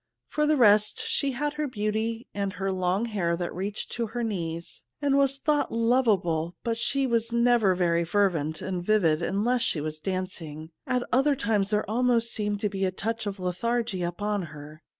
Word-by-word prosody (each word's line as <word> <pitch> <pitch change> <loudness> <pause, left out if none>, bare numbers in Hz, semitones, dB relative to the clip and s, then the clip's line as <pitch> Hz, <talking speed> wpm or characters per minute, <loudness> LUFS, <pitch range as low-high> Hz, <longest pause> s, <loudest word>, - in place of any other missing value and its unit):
For 300 0 +1
the 305 0 +3
rest, 210 -3 +4
she 275 -2 0
had 295 +3 -2
her 300 0 -2
beauty 220 0 -2
and 200 -1 -2
her 195 -1 -2
long 185 +3 0
hair, 180 -7 -1
that 175 0 -3
reached 200 +3 -4
to 235 -1 -2
her 240 +3 -3
knees, 170 -6 -4 0.2
and 285 -2 +2
was 275 -1 +3
thought 295 +1 +1
lovable; 205 -9 +1
but 230 -1 0
she 270 +4 0
was 230 -2 0
never 235 -5 +3
very 170 -2 +2
fervent 165 -4 0
and 180 -2 -3
vivid 175 -6 +3
unless 230 +8 +1
she 160 - +1
was 155 +1 -4
dancing; 165 -4 -5 0.2
at 250 -1 +1
other 275 +3 +3
times 205 -4 0
there 210 0 0
almost 235 +1 +2
seemed 210 -1 -1
to 210 - +2
be 195 -1 -3
a 190 - +3
touch 225 +3 -3
of 200 -1 -4
lethargy 225 +3 -1
upon 205 +4 -1
her. 150 +1 -11
210 Hz, 185 wpm, -27 LUFS, 180-235 Hz, 0.2 s, rest